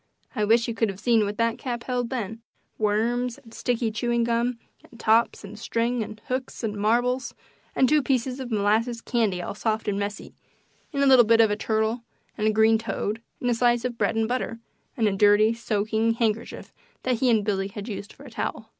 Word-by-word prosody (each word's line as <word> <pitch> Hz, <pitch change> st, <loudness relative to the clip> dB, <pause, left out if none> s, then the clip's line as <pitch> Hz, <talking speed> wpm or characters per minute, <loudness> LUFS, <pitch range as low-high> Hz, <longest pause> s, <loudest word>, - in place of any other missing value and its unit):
I 210 Hz, -, +1 dB
wish 230 Hz, +2 st, +3 dB
you 230 Hz, -, -2 dB
could 225 Hz, -1 st, 0 dB
have 195 Hz, -1 st, -6 dB
seen 225 Hz, -1 st, +3 dB
what 205 Hz, +1 st, -4 dB
that 230 Hz, 0 st, 0 dB
cap 240 Hz, -3 st, -4 dB
held 245 Hz, -2 st, -2 dB
then 225 Hz, -3 st, -4 dB, 0.4 s
worms, 230 Hz, +4 st, 0 dB
and 235 Hz, -5 st, -17 dB
sticky 235 Hz, -2 st, -1 dB
chewing 235 Hz, +2 st, 0 dB
gum, 235 Hz, +1 st, 0 dB, 0.3 s
and 235 Hz, -, -17 dB
tops, 225 Hz, +1 st, +2 dB
and 205 Hz, +1 st, -9 dB
strings, 235 Hz, +1 st, -1 dB
and 215 Hz, 0 st, -9 dB
hooks, 255 Hz, -1 st, -4 dB
and 215 Hz, -2 st, -2 dB
marbles, 240 Hz, +5 st, 0 dB, 0.4 s
and 260 Hz, -, +4 dB
two 300 Hz, +3 st, +4 dB
pieces 260 Hz, 0 st, -1 dB
of 260 Hz, -2 st, -5 dB
molasses 220 Hz, +2 st, +1 dB
candy 215 Hz, -7 st, 0 dB
all -, -, -4 dB
soft 220 Hz, +1 st, -2 dB
and 200 Hz, -1 st, 0 dB
messy, 205 Hz, 0 st, -5 dB, 0.6 s
and 280 Hz, -2 st, 0 dB
a -, -, +4 dB
little 260 Hz, -3 st, +7 dB
bit 230 Hz, +1 st, +4 dB
of 220 Hz, -2 st, +5 dB
a -, -, +1 dB
turtle, 220 Hz, +2 st, -1 dB, 0.3 s
and 215 Hz, -1 st, 0 dB
a -, -, +4 dB
green 220 Hz, +1 st, +4 dB
toad, 225 Hz, -1 st, -3 dB, 0.2 s
and 245 Hz, -, 0 dB
a -, -, +3 dB
slice 240 Hz, 0 st, +2 dB
of 240 Hz, -2 st, -4 dB
bread -, -, +1 dB
and 225 Hz, 0 st, +1 dB
butter, 245 Hz, -1 st, -2 dB, 0.4 s
and 225 Hz, -3 st, +2 dB
a 200 Hz, -, 0 dB
dirty, 210 Hz, +2 st, +5 dB
soaking, 220 Hz, 0 st, 0 dB
handkerchief 225 Hz, -1 st, -2 dB, 0.3 s
that 255 Hz, -2 st, +1 dB
he 255 Hz, -, +3 dB
and 220 Hz, -3 st, +3 dB
Billy 195 Hz, -2 st, 0 dB
had 200 Hz, +1 st, -8 dB
used 205 Hz, -2 st, -6 dB
for -, -, -15 dB
a 270 Hz, -, -12 dB
towel. 220 Hz, 0 st, -4 dB
230 Hz, 210 wpm, -25 LUFS, 215-240 Hz, 0.6 s, little